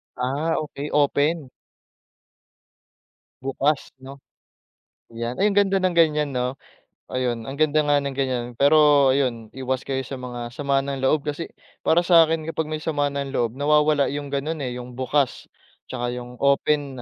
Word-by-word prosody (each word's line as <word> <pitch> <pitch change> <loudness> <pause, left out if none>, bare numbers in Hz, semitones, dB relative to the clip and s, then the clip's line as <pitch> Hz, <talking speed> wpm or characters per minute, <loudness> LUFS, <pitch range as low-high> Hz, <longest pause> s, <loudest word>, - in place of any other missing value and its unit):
Ah, 140 +6 -1
okey 150 -1 -5
open. 145 +1 +1 1.9
Bukas 135 +2 -1
'no, 135 +1 -10 0.9
yan. 115 +2 -4
Ay 200 - +2
ang 200 - -3
ganda 195 -1 +2
ng 185 -1 +1
ganiyan 150 -3 +3
'no. 125 0 -2 0.6
Ayun, 125 -3 -1
ang 135 - -5
ganda 155 0 +3
nga 145 0 +4
ng 140 -1 -4
ganiyan. 130 -3 -1
Pero 145 -1 +5
ayun, 120 -5 -1
iwas 130 0 -2
kayo 135 -1 -1
sa 135 - -5
mga 120 -1 -6
sama 140 -1 +1
ng 140 -1 -4
loob 145 +2 +2
kasi, 150 +3 -3 0.4
para 165 - +4
sa'kin 165 -2 +4
kapag 160 -1 -2
may 155 - -2
sama 145 -3 0
ng 140 -1 -4
loob 115 -2 +1
nawawala 150 0 +3
'yung 145 0 -4
ganun 150 +3 -2
eh 125 -1 -4
'yung 125 0 -9
bukas, 130 +1 -1 0.4
'tsaka 120 -1 -2
'yung 125 0 -8
open 140 -1 +1
140 Hz, 155 wpm, -23 LUFS, 130-150 Hz, 1.9 s, Pero